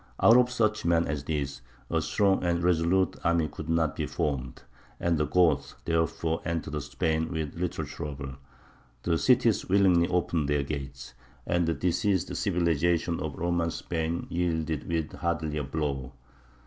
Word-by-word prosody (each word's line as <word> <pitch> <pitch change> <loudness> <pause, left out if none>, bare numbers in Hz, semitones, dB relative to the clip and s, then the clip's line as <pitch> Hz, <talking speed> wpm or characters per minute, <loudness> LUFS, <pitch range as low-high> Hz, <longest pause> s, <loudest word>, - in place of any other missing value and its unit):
Out 115 - +7
of 125 0 +5
such 110 -4 +1
men 85 0 +3
as 70 -1 -3
these 70 -3 -3 0.3
a - - +2
strong 100 -2 +2
and 85 -1 +1
resolute 90 +2 +2
army 85 -2 +2
could 80 +1 -8
not 80 -2 +1
be - - -2
formed; 65 -5 -3 0.4
and 85 -1 +1
the 75 - +1
Goths 85 -2 +2
therefore 80 0 0
entered 75 -3 -3
Spain 80 +2 -1
with 80 -4 -3
little 90 0 -3
trouble; 70 -4 -6 0.7
the 85 -2 +1
cities 125 -6 +3
willingly 90 -3 +4
opened 85 -4 0
their 75 -1 +2
gates, 70 -3 -6 0.3
and 85 -1 +1
the 80 - +1
diseased 95 +1 0
civilization 85 0 +1
of 80 -3 -4
Roman 85 -1 0
Spain 80 0 -3
yielded 80 -3 -1
with 80 -2 -1
hardly 80 -3 -2
a - - -2
blow. 70 -2 -3
85 Hz, 150 wpm, -28 LUFS, 75-85 Hz, 0.7 s, Out